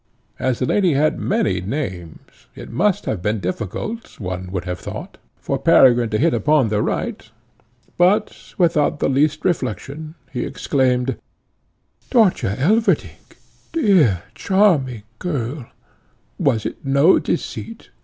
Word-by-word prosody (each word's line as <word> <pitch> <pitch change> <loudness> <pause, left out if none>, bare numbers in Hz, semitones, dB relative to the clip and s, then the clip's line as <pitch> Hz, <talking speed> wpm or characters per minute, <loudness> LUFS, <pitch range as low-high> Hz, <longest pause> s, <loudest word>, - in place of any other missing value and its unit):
As 130 -2 0
the 125 - -1
lady 185 +2 +2
had 155 +2 +1
many 195 - 0
names, 95 - -6
it - - -10
must 185 - +1
have 100 - -2
been 105 +3 -1
difficult, 105 - -5
one 90 -2 -5
would 95 -2 -3
have 90 -1 -4
thought, - - -8 0.2
for - - -3
Peregrine 120 -3 +5
to 105 - 0
hit 160 +7 +2
upon 150 -6 +2
the 105 0 0
right, - - -3 0.7
but, 200 +5 +1
without 160 -5 +2
the - - 0
least 150 +3 +1
reflection, 155 - -3 0.2
he 125 -2 -3
exclaimed, 130 -2 0 0.9
"Dörtje 195 - +2
Elverdink! 220 - 0 0.4
dear, 180 - +3
charming 155 - +2 0.2
girl; 135 -6 -3 0.7
was 110 -1 +1
it - - -5
no 140 +6 +4
deceit? 225 -1 -5
135 Hz, 125 wpm, -20 LUFS, 110-175 Hz, 0.9 s, Peregrine